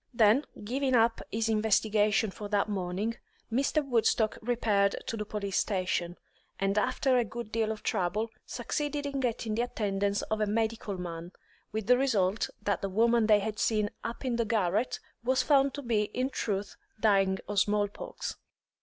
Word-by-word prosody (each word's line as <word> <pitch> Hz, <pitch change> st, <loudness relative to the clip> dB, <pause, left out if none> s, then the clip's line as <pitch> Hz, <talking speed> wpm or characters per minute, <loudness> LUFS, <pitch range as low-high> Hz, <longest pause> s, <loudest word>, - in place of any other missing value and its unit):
Then, 225 Hz, +5 st, +5 dB, 0.2 s
giving 260 Hz, +4 st, 0 dB
up 230 Hz, 0 st, +3 dB
his 225 Hz, +1 st, 0 dB
investigations 215 Hz, -1 st, +2 dB
for 205 Hz, -1 st, -7 dB
that 205 Hz, -1 st, +2 dB
morning, 200 Hz, +3 st, -2 dB, 0.3 s
Mr. 280 Hz, +5 st, +1 dB
Woodstock 225 Hz, -3 st, +2 dB
repaired 215 Hz, -4 st, +2 dB
to -, -, -3 dB
the 210 Hz, -1 st, -4 dB
police 200 Hz, -2 st, -1 dB
station, 180 Hz, -3 st, -1 dB, 0.4 s
and 195 Hz, 0 st, +1 dB
after 255 Hz, +4 st, +2 dB
a -, -, +3 dB
good 235 Hz, 0 st, -7 dB
deal 220 Hz, -1 st, 0 dB
of 215 Hz, -, -6 dB
trouble, 210 Hz, +3 st, 0 dB
succeeded 295 Hz, -1 st, -3 dB
in 280 Hz, -1 st, -2 dB
getting 235 Hz, -3 st, -1 dB
the 225 Hz, -, +1 dB
attendance 200 Hz, -4 st, -1 dB
of 215 Hz, 0 st, -2 dB
a 210 Hz, -, +2 dB
medical 220 Hz, -2 st, -1 dB
man, 170 Hz, 0 st, -6 dB, 0.4 s
with 220 Hz, -1 st, -3 dB
the 250 Hz, +1 st, +5 dB
result 215 Hz, -7 st, +1 dB
that 205 Hz, -3 st, 0 dB
the 195 Hz, -, -2 dB
woman 230 Hz, +3 st, +3 dB
they 210 Hz, -2 st, +5 dB
had 215 Hz, +1 st, -4 dB
seen 210 Hz, -2 st, +1 dB
up 235 Hz, +3 st, -5 dB
in 245 Hz, -2 st, 0 dB
the 235 Hz, -, +2 dB
garret 215 Hz, +1 st, 0 dB, 0.2 s
was 255 Hz, +2 st, +2 dB
found 275 Hz, -2 st, +3 dB
to 285 Hz, -, -6 dB
be 220 Hz, -4 st, +1 dB
in 255 Hz, +2 st, 0 dB
truth 200 Hz, -4 st, -3 dB, 0.2 s
dying 195 Hz, -3 st, +3 dB
of 205 Hz, -1 st, +1 dB
small 205 Hz, 0 st, +2 dB
pox. -, -, -7 dB
220 Hz, 170 wpm, -30 LUFS, 205-235 Hz, 0.4 s, Then